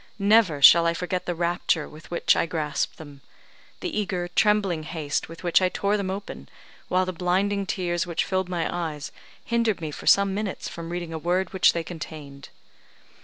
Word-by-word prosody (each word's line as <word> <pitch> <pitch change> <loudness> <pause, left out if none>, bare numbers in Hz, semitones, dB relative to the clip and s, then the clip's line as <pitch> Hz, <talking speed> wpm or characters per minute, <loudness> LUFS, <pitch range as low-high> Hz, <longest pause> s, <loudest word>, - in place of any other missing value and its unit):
Never 200 -8 +3
shall 170 +3 +9
I 170 - +1
forget 180 +1 -3
the 175 - -1
rapture 170 -2 0
with 155 +2 -14
which 170 - +2
I - - +1
grasped 150 -4 -2
them 145 -3 -12 0.6
the 355 - -2
eager, 180 -3 -2
trembling 195 -3 +2
haste 155 -2 -3
with 165 +2 -11
which 175 +1 +3
I 185 - +3
tore 200 +2 0
them 200 -2 -2
open, 190 - -7 0.4
while 185 0 +1
the 185 - -4
blinding 195 +3 0
tears 175 -3 -1
which 170 - -1
filled 185 -1 -1
my 175 -2 -1
eyes 155 -4 -4 0.3
hindered 230 -3 +1
me 160 -2 -5
for - - -9
some 200 -1 +5
minutes 205 -1 -4
from 170 0 -7
reading 175 -1 -5
a 160 - -4
word 180 +3 -1
which 190 - +4
they 170 - -2
contained. 155 -5 -9
175 Hz, 185 wpm, -25 LUFS, 160-190 Hz, 0.6 s, shall